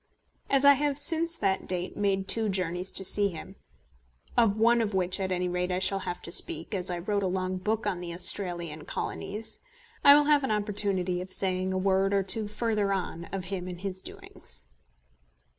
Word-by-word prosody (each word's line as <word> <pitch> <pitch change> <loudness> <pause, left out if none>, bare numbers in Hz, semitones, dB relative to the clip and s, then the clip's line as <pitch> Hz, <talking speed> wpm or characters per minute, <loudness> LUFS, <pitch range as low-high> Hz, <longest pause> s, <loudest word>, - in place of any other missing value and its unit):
As 275 0 +2
I 285 - +9
have 285 0 -1
since 330 +3 +1
that 195 -2 -1
date 180 0 -3
made 195 -2 -1
two 225 -2 +2
journeys 180 -1 -2
to 190 - +5
see 205 +2 +5
him, 185 +2 -10 0.8
of 225 -3 +3
one 235 +2 +3
of 210 -3 -2
which 185 +1 +2
at 190 -1 -2
any 180 0 -1
rate 180 +1 -2
I 180 - 0
shall 195 +1 +3
have 175 - -6
to - - -4
speak, 165 +2 +1
as 185 -2 -2
I 175 - -3
wrote 200 +4 -2
a 190 - -1
long 185 0 -2
book 215 +4 -2
on 180 - -2
the 175 -1 -6
Australasian 175 -3 +1
Colonies, 215 +3 -5 0.4
I 280 - +9
will 295 - +5
have 295 -1 +3
an 265 - -2
opportunity 200 -4 0
of 185 - -9
saying 185 -1 -1
a 190 - -1
word 195 +1 +1
or 195 - +2
two 210 +3 0
further 210 -1 -1
on 180 -3 -3
of 195 +1 -6
him 180 -1 -4
and 180 -1 -7
his 190 -1 -5
doings. 60 - -7
190 Hz, 200 wpm, -27 LUFS, 180-210 Hz, 0.8 s, I